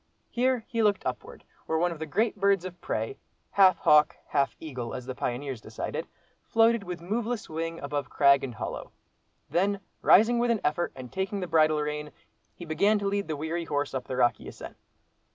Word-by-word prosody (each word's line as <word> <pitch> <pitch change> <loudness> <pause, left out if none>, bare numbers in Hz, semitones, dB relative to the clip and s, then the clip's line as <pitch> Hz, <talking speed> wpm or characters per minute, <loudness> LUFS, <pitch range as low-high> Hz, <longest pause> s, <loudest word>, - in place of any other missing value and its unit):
Here 250 -1 +1
he 230 -1 -1
looked 205 -2 +2
upward, 125 -1 -5 0.2
where 160 - +1
one 175 +2 +1
of 165 - -7
the 160 - -4
great 220 +10 +1
birds 200 -2 +2
of 180 -1 -8
prey, 110 +4 -3 0.3
half 190 -2 +6
hawk, 150 0 +5
half 140 -1 +1
eagle, 130 -7 -5
as 125 - -6
the 130 - -4
pioneers 125 0 -3
decided, - - -5 0.4
floated 230 0 +3
with 175 -2 -6
moveless 225 +4 -2
wing 165 +1 -4
above 145 -1 -3
crag 140 -1 +5
and 125 -4 -5
hollow. - - -6 0.6
Then 200 +3 +1 0.2
rising 235 +4 +6
with 240 0 +1
an 230 -3 +1
effort, 160 +4 0
and 125 -2 -9
taking 190 +1 -2
the 185 - -2
bridle 155 -2 +3
rein, 150 0 -3 0.5
he 175 - -9
began 200 +7 +2
to 205 - -3
lead 200 -2 -1
the 155 -2 -3
weary 165 +3 -3
horse 145 -1 -2
up 130 -2 -3
the 130 - -4
rocky 120 -2 +2
ascent. - - -9
165 Hz, 190 wpm, -28 LUFS, 145-200 Hz, 0.6 s, half